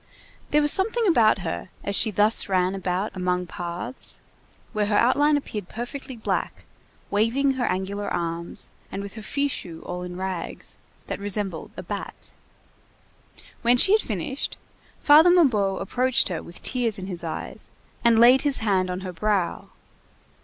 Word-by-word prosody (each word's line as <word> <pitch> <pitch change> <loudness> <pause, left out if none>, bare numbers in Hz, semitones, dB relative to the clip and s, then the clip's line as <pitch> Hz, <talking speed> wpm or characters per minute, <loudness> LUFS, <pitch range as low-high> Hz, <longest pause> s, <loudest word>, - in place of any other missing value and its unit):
There 300 0 +3
was 295 - +5
something 445 +4 +2
about 225 - +4
her, 175 +1 -4
as 200 - -1
she 220 - +6
thus 210 +1 +2
ran 185 0 +2
about 190 +1 -2
among 180 -1 -1
paths, 175 +9 -6 0.5
where 210 -2 0
her 210 - +1
outline 290 +5 +4
appeared 210 -9 -6
perfectly 250 +3 -6
black, 220 - -3 0.5
waving 230 +7 +2
her 260 -2 -1
angular 195 +2 -2
arms, 170 0 -3 0.2
and 200 - -4
with 200 - -8
her 220 - -8
fichu 215 - -3
all 180 0 -5
in 180 0 -6
rags, 185 -2 -5 0.3
that - - -5
resembled 200 -3 -3
a - - -6
bat. - - -7 1.3
When 240 +1 +4
she 380 - +7
had 430 +1 +5
finished, 215 - -3 0.4
Father 305 +4 +7
Mabeuf 220 - +3
approached 250 +3 +2
her 175 - -3
with 170 - -12
tears 235 -4 0
in 190 - -6
his 180 -3 -5
eyes, 165 - -6 0.3
and 235 -1 +5
laid 245 +3 +7
his 285 -2 +1
hand 190 -4 +1
on 180 +1 -3
her 185 -1 -6
brow. 185 -1 -1
205 Hz, 155 wpm, -24 LUFS, 185-255 Hz, 1.3 s, she